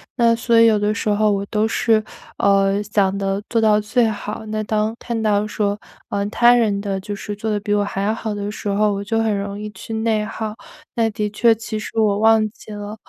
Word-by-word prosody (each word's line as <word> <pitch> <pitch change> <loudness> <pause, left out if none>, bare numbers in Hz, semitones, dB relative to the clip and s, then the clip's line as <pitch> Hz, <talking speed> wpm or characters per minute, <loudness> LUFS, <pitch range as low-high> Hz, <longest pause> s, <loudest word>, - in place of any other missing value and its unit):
那 235 -2 +4
所 230 0 +2
以 230 - +7
有 220 -2 +4
的 210 +1 0
时 220 - -4
候 210 0 +3
我 200 0 -1
都 210 +1 0
是， 220 0 +2 0.3
呃， 195 0 +2
想 200 -2 +1
得 195 0 -1
做 230 - +1
到 215 -1 +4
最 230 +3 +1
好 215 +1 -6
那 215 0 -2
当 215 +1 0
看 235 -2 -3
到 210 -1 +2
说， 205 -1 -1 0.3
嗯， 200 0 -2
他 240 +2 +5
人 215 -5 +2
的 200 -2 -2
就 205 +2 -6
是 205 +1 -6
做 215 +2 -4
得 210 - 0
比 205 0 -1
我 205 0 +2
还 200 -1 -3
要 210 +2 +1
好 220 -2 -4
的 205 0 -4
时 210 - -7
候， 205 +1 +2
我 200 - -3
就 225 +3 -1
很 220 -2 +1
容 200 0 -5
易 210 0 -5
去 210 +2 -9
内 220 -1 0
耗。 215 0 -5 0.4
那 230 -2 +2
的 210 -1 -2
确 230 +2 +4
其 220 -1 -5
实 215 - -8
我 210 -2 +2
忘 220 0 +4
记 215 - -14
了， 205 0 -6
210 Hz, 250 characters per minute, -20 LUFS, 205-220 Hz, 0.4 s, 以